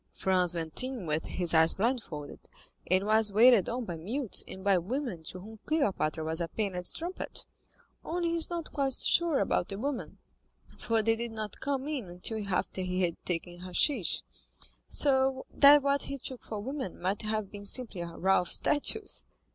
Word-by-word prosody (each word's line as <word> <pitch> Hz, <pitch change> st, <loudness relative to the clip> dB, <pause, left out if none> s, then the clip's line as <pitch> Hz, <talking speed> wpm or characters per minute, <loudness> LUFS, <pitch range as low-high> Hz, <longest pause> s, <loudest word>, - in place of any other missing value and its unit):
Franz 180 Hz, -2 st, +2 dB
went 165 Hz, +5 st, 0 dB
in 255 Hz, -7 st, -5 dB
with 155 Hz, 0 st, -1 dB
his 175 Hz, -2 st, +1 dB
eyes 160 Hz, 0 st, +5 dB
blindfolded, 205 Hz, -, -3 dB, 0.5 s
and 185 Hz, +2 st, +3 dB
was 215 Hz, 0 st, +5 dB
waited 225 Hz, -1 st, +6 dB
on 240 Hz, 0 st, -3 dB
by 175 Hz, -, -5 dB
mutes 230 Hz, -, -1 dB
and 190 Hz, -, -9 dB
by 200 Hz, -1 st, +4 dB
women 200 Hz, -, -3 dB
to 180 Hz, +3 st, -7 dB
whom 215 Hz, +3 st, -11 dB
Cleopatra 195 Hz, -, 0 dB
was 160 Hz, +2 st, -2 dB
a 170 Hz, -, -1 dB
painted 185 Hz, -3 st, -3 dB
strumpet. 350 Hz, +3 st, -2 dB, 0.6 s
Only 340 Hz, +1 st, -1 dB
he 335 Hz, -, 0 dB
is 330 Hz, -, +3 dB
not 340 Hz, -2 st, -5 dB
quite 275 Hz, -2 st, +2 dB
sure 335 Hz, +3 st, +3 dB
about -, -, 0 dB
the 195 Hz, -, -5 dB
women, 270 Hz, +3 st, -4 dB, 0.6 s
for 225 Hz, -1 st, 0 dB
they 225 Hz, +1 st, +3 dB
did 235 Hz, 0 st, -5 dB
not 215 Hz, -2 st, -5 dB
come 275 Hz, -1 st, -2 dB
in 290 Hz, -7 st, -3 dB
until 205 Hz, +5 st, -2 dB
after 190 Hz, 0 st, -1 dB
he 185 Hz, 0 st, -1 dB
had 170 Hz, -2 st, -2 dB
taken 175 Hz, 0 st, -3 dB
hashish, 185 Hz, -, +1 dB, 0.7 s
so 265 Hz, -2 st, +2 dB
that 285 Hz, 0 st, +7 dB
what 280 Hz, 0 st, +2 dB
he 275 Hz, -, -4 dB
took 260 Hz, -1 st, -6 dB
for 215 Hz, -, -6 dB
women 260 Hz, -, -5 dB
might 190 Hz, +4 st, -1 dB
have 215 Hz, -2 st, -2 dB
been 205 Hz, -1 st, -6 dB
simply 225 Hz, -6 st, -3 dB
a 170 Hz, -, -4 dB
row 185 Hz, +3 st, +2 dB
of 180 Hz, -, -6 dB
statues." 395 Hz, +8 st, +1 dB
215 Hz, 180 wpm, -30 LUFS, 180-265 Hz, 0.7 s, that